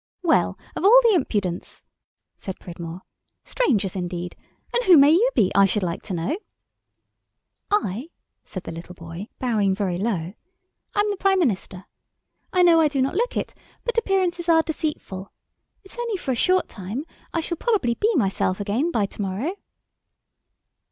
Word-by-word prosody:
"Well, 335 - +2 0.2
of - - -4
all 450 +6 +8
the 460 -2 +5
impudence," 205 - -2 0.5
said 190 -3 -7
Pridmore. 170 0 -8 0.4
"Strangers, 210 - 0
indeed! 175 -1 -4 0.4
And 485 - +1
who 365 -4 +8
may 285 +1 +7
you 410 +10 +5
be, 190 - +3
I 200 0 +6
should 195 +1 0
like 170 -1 -2
to 190 - -3
know?" 250 - -2 1.3
"I," 285 - -1 0.3
said 185 - -7
the - - -6
little 170 +2 -9
boy, 165 +4 -8
bowing 210 -6 +1
very 190 -3 -1
low, 190 -5 -2 0.6
"am 415 0 +2
the 405 - -3
Prime 390 -1 +3
Minister. 195 - -1 0.7
I 365 -1 +4
know 335 -2 +6
I 310 - +5
do 285 -2 -2
not 265 +1 +1
look 475 +7 0
it, - - -3 0.3
but 480 - -2
appearances 360 -5 0
are 325 -1 +5
deceitful. 300 - -4 0.5
It's 385 +5 -13
only 465 -4 -1
for 290 -7 -3
a - - +1
short 370 +9 +2
time. 215 +8 -6 0.3
I 330 - -1
shall 335 +1 -3
probably 395 - +1
be 430 - +1
myself 190 -5 +1
again 215 +11 0
by 220 -11 +1
to 200 - -7
morrow." 205 - -2
245 Hz, 165 wpm, -23 LUFS, -, 1.3 s, all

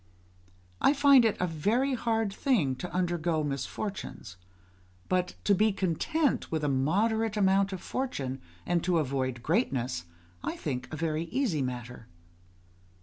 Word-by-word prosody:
I 285 - +5
find 280 -2 +7
it 220 - +2
a 180 - +2
very 210 - +1
hard 225 -4 0
thing 195 - +1
to 180 - -6
undergo 175 -3 0
misfortunes, 145 - -5 0.7
but 180 -1 0
to 205 - +4
be 215 +3 +3
content 200 - 0
with 160 -2 -1
a - - +2
moderate 210 +11 +1
measure 195 -1 +3
of 180 - -9
fortune, 140 - -3 0.2
and 175 -1 +1
to 180 -2 +2
avoid 130 -4 -1
greatness, 130 - 0 0.4
I - - -2
think 130 -4 -4
a 155 - -4
very 160 +1 -1
easy 180 - 0
matter. 125 -2 -5
175 Hz, 140 wpm, -29 LUFS, 140-220 Hz, 0.7 s, find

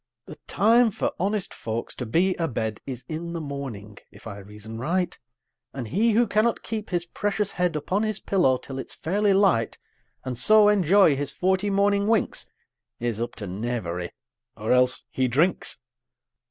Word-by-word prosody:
The - - -11
time 230 +3 +4
for 205 - -2
honest 200 +2 -1
folks 115 +1 -4
to 125 - -6
be 180 +11 +2
a 165 - 0
bed 110 -4 -3
Is 130 -2 -6
in 170 +2 -5
the 170 - -3
morning, 135 -9 -7
if 100 - -17
I 100 -3 -7
reason 105 +3 -8
right; 175 +7 0 0.6
And 125 -5 -5
he 220 - +2
who 235 +3 +4
cannot 220 +2 +1
keep 220 -1 -4
his 175 -2 -1
precious 205 +3 -2
head 180 -3 0
Upon 185 +7 -1
his 215 -1 -1
pillow 155 -10 +2
till 135 +1 -7
it's - - -7
fairly 200 +5 +1
light, 190 - +3 0.5
And 130 -1 -3
so 215 -1 +6
enjoy 195 -4 +5
his 140 0 -2
forty 190 +2 +1
morning 200 +1 +2
winks, 225 -1 0 0.5
Is 115 -2 -2
up 120 - -3
to 110 - -6
knavery; 95 -4 -3 0.5
or 110 0 -2
else 125 0 +3
he 130 -1 +1
drinks! 150 +10 +1
165 Hz, 170 wpm, -25 LUFS, -, 0.6 s, so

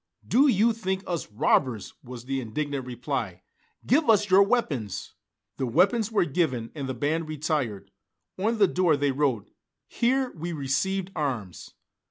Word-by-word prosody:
"Do 275 +5 +5
you 230 -1 +4
think 190 -3 -3
us 170 -11 -4
robbers?" 115 +1 +1
was 125 -1 -9
the 135 0 -2
indignant 135 +3 -3
reply. 120 -7 -4 0.4
"Give 290 +1 +3
us 210 -2 +4
your 190 +1 +8
weapons!" 170 - -1 0.4
The 130 - -1
weapons 210 - +2
were 210 -5 +2
given 135 -8 -1
and 140 -4 -5
the 130 - -3
band 155 +5 -1
retired; 145 -9 -2 0.4
on 220 +5 0
the 200 -2 +5
door 175 -4 +2
they 140 0 +1
wrote, 130 -6 -1 0.3
"Here 260 +2 0
we 170 +1 -5
received 175 +7 -1
arms!" 120 - -4
150 Hz, 150 wpm, -26 LUFS, 125-195 Hz, 0.4 s, your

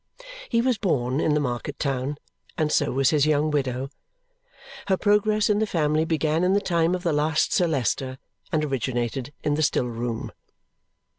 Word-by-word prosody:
He 230 - +2
was 245 -3 +1
born 130 - 0
in 155 -2 +2
the - - +2
market 125 -4 -3
town, 135 0 -2 0.4
and 155 -1 0
so 145 - +2
was 135 +1 +2
his 150 -1 +3
young 155 0 +2
widow. 135 -2 -1 1.0
Her 190 -1 +2
progress 210 +1 +2
in 210 -1 +2
the 220 - +1
family 155 -3 +1
began 160 +1 0
in 185 +1 +3
the 200 - +4
time 170 -3 +1
of 180 - -6
the 170 -4 +1
last 155 +1 +1
Sir 175 - +3
Leicester 130 -2 -1 0.3
and 155 -2 +1
originated 130 -1 -2
in 150 - +1
the 150 - 0
still 145 -4 +2
room. 115 0 -4
150 Hz, 175 wpm, -24 LUFS, 135-175 Hz, 1.0 s, the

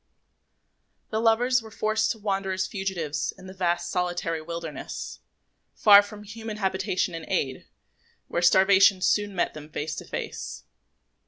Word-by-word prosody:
The 220 0 0
lovers 240 +2 +3
now - - -15
were - - -9
forced 215 +1 0
to - - -1
wander 195 -2 -2
as 185 0 -1
fugitives 190 -7 -3
in 190 -1 -12
a 185 - -9
vast 175 -2 -1
solitary 175 -2 -1
wilderness, 165 -1 -6 0.6
far 205 -1 +8
from 205 0 -10
human 220 +1 -7
habitation 190 -2 -1
and 165 -1 -6
aid, 130 -2 0
and - - -22 0.6
where 170 - -1
starvation 190 +1 +5
soon 205 -1 +1
met 175 - 0
them 155 0 -10
face 155 0 -4
to - - -6
face. - - -6
190 Hz, 155 wpm, -26 LUFS, 175-210 Hz, 0.6 s, far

